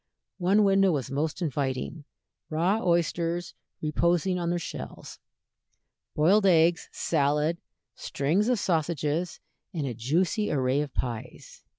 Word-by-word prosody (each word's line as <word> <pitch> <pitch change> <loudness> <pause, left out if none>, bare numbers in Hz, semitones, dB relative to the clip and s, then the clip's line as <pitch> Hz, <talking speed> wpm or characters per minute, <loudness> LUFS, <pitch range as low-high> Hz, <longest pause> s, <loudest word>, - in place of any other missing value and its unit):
One 195 +4 +4
window 195 -1 +4
was 140 -3 -2
most 155 +5 -2
inviting 140 0 -3 0.4
raw 180 +8 +1
oysters 170 0 0 0.3
reposing 170 +4 +1
in 170 -1 -1
their 175 - 0
shells, 170 - -7 1.0
boiled 195 +7 +4
eggs, 165 -1 +3
salad, 150 +2 0 0.3
strings 170 - 0
of 250 - +2
sausages, 165 -2 -1 0.4
and 155 -4 -1
a 130 - -3
juicy 170 - 0
array 135 0 +1
of 150 -2 -4
pies. 115 -3 -5
165 Hz, 115 wpm, -27 LUFS, 145-180 Hz, 1.0 s, One